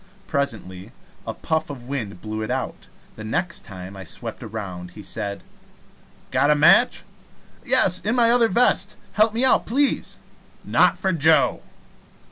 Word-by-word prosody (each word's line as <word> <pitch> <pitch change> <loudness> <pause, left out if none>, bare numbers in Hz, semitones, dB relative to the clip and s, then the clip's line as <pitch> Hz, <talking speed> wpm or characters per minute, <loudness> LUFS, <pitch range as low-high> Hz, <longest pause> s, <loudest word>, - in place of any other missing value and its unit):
Presently 95 -10 -3 0.4
a - - -4
puff 160 -1 -2
of 135 -4 -8
wind 120 -8 -5
blew 110 0 -5
it 110 - -4
out. - - -4 0.3
The 110 - -8
next 170 - -2
time 95 -1 -9
I 95 - -8
swept 115 +7 -6
around 100 -6 -7
he 105 - -9
said: 100 0 -5 0.9
"Got 145 - +2
a 150 - +5
match?" 165 +7 +5 0.6
"Yes; 235 -9 +3
in 220 +4 -1
my 235 -2 +4
other 240 -1 +5
vest. 240 +6 +2 0.2
Help 215 +1 +4
me 235 +4 +1
out, 260 - +3
please." 275 +4 0 0.5
"Not - - +3
for 190 -2 0
Joe." 160 -2 +3
140 Hz, 150 wpm, -23 LUFS, -, 0.9 s, a